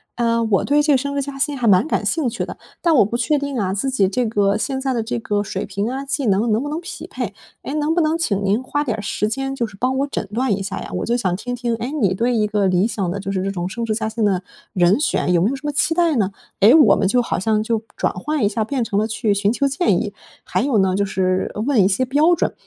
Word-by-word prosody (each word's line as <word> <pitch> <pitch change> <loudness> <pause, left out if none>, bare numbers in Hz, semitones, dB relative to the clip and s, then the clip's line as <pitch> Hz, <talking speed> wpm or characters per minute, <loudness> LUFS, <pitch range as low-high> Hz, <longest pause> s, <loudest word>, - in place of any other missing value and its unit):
哎， 230 -1 +1
我 220 -4 +1
对 290 +1 +3
这 295 0 +2
个 - - +5
升 280 +2 -3
职 280 - 0
加 275 0 -6
薪 290 0 0
还 245 - -2
蛮 195 +6 +5
感 - - -1
兴 320 -5 0
趣 230 - -2
的， - - -8 0.2
但 340 -2 +3
我 240 - +6
不 215 - -4
确 245 +5 +1
定 280 -1 -3
啊， 190 -2 -1
自 205 +7 -1
己 205 -7 +2
这 245 +5 0
个 205 -2 +1
现 265 +3 -2
在 265 0 -1
的 235 - 0
这 240 +2 -3
个 205 -2 -1
水 195 -1 -4
平 200 +2 -3
啊、 265 +2 -4
技 280 0 -2
能， 215 +2 +2
能 215 +2 +2
不 290 - -4
能 310 +3 -3
匹 365 - -8
配。 - - -5 0.3
哎， 275 - -6
能 305 +1 +1
不 350 - +3
能 315 +1 +1
请 205 -12 -1
您 200 +4 +1
花 290 +3 -1
点 235 -7 -2
儿 - - -4
时 210 +1 -1
间， 270 +4 -3
就 240 - -1
是 215 -3 -11
帮 255 +5 0
我 280 - 0
诊 215 - -4
断 250 +2 0
一 200 0 0
下 195 0 -4
呀， - - -7
我 - - -2
就 235 - +1
想 195 -7 0
听 245 +4 -4
听， 240 -1 -2
哎， 230 +3 -4
你 195 -4 +3
对 235 +5 0
一 215 -2 +2
个 210 -1 0
理 185 +1 +2
想 195 -6 -2
的 180 - -3
就 195 +1 -4
是 190 -1 -1
这 195 - -1
种 180 -2 -3
升 230 +4 -4
职 220 - -1
加 220 0 -2
薪 220 +1 -2
的 190 -3 +1 0.3
人 180 +5 +3
选， 290 - 0
有 170 - +3
没 195 - +3
有 275 - -2
什 270 - -10
么 295 - 0
期 300 +3 +1
待 335 -2 +2
呢？ 200 -3 +1 0.3
诶， 210 +4 +8
我 310 -2 +7
们 - - +1
就 245 +5 +3
好 235 - -2
像 215 +2 +1
就 225 -1 -1 0.2
转 - - 0
换 295 +8 -2
一 - - +4
下， 220 +1 -1
变 260 +1 -1
成 205 -3 -2
了 215 - +1
去 220 -1 0
寻 200 +1 +1
求 280 +3 +1
建 315 +6 +1
议。 - - -4 0.3
还 - - -1
有 270 -5 +1
呢， 190 -1 +2
就 200 +1 +1
是， 185 -1 0
呃， 210 - -3
问 250 -2 +3
一 - - +4
些 200 +6 +1
标 295 +7 +3
准， - - -1
230 Hz, 325 characters per minute, -20 LUFS, 200-275 Hz, 0.3 s, 诶